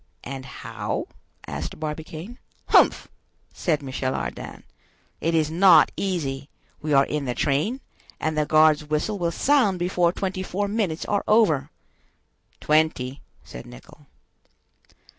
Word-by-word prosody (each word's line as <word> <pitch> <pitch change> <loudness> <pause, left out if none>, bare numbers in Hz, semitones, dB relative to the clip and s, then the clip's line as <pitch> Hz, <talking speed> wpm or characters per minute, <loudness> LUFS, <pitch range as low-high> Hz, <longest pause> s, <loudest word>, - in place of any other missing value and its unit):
"And 135 0 -7
how?" - - -5 0.4
asked 75 - -6
Barbicane. 160 +7 -6 0.3
"Humph!" - - +5 0.5
said 155 -4 -1
Michel 130 -1 -2
Ardan, - - -6 0.6
"it 165 +1 0
is 155 -1 +1
not 185 +3 +6
easy; 150 -8 -3 0.3
we 150 - -3
are 135 -1 +5
in 150 -1 -3
the 125 -1 -2
train, 155 - 0 0.4
and 155 0 -1
the 150 -1 0
guard's 155 -1 +5
whistle 155 +8 -2
will 170 -1 +1
sound 245 -1 +2
before 175 -1 +1
twenty 185 0 -3
four 195 +2 -2
minutes 200 -6 -1
are 205 -1 0
over." 160 -11 +3 0.9
"Twenty," 150 -4 +1 0.2
said 60 - -10
Nicholl. - - -15
155 Hz, 125 wpm, -24 LUFS, 140-185 Hz, 0.9 s, not